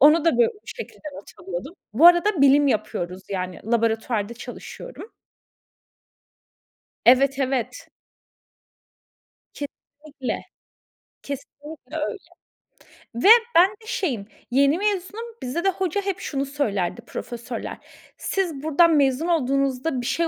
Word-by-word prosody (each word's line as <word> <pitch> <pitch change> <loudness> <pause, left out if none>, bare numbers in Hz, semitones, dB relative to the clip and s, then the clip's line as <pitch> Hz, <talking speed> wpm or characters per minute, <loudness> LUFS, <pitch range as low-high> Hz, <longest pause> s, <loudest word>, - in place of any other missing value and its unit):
onu 300 +3 +6
da 330 -6 +3
bu 240 - +6 0.2
şekilde 465 -9 -8
not 200 - -11
alıyordum. 190 - -6 0.2
Bu 295 +10 +6
arada 350 0 +5
bilim 280 +1 +6
yapıyoruz, 190 -5 -2
yani 185 -2 -4
laboratuvarda 225 -1 0
çalışıyorum. 455 - -9 1.9
Evet, 270 +3 +5
evet. 270 - -2 1.7
Kesinlikle, 285 -1 -7 0.8
kesinlikle 285 +1 -9
öyle 315 +8 -2 1.0
ve 240 +11 +2 0.3
ben 350 +3 +7
de 430 +1 -17
şeyim, 245 - -2 0.2
yeni 280 +5 +4
mezunum, 410 +2 -2 0.2
bizde 275 +8 -3
de 390 - +4
hoca 380 0 -1
hep 390 -2 -3
şunu 275 -1 -2
söylerdi 220 -11 -2
profesörler: 235 0 -6 0.4
"Siz 335 -8 -2
buradan 320 +2 +4
mezun 280 +3 +2
olduğunuzda 275 -3 0
bir - - -6
şey 330 +6 +1
280 Hz, 110 wpm, -24 LUFS, 245-335 Hz, 1.9 s, ben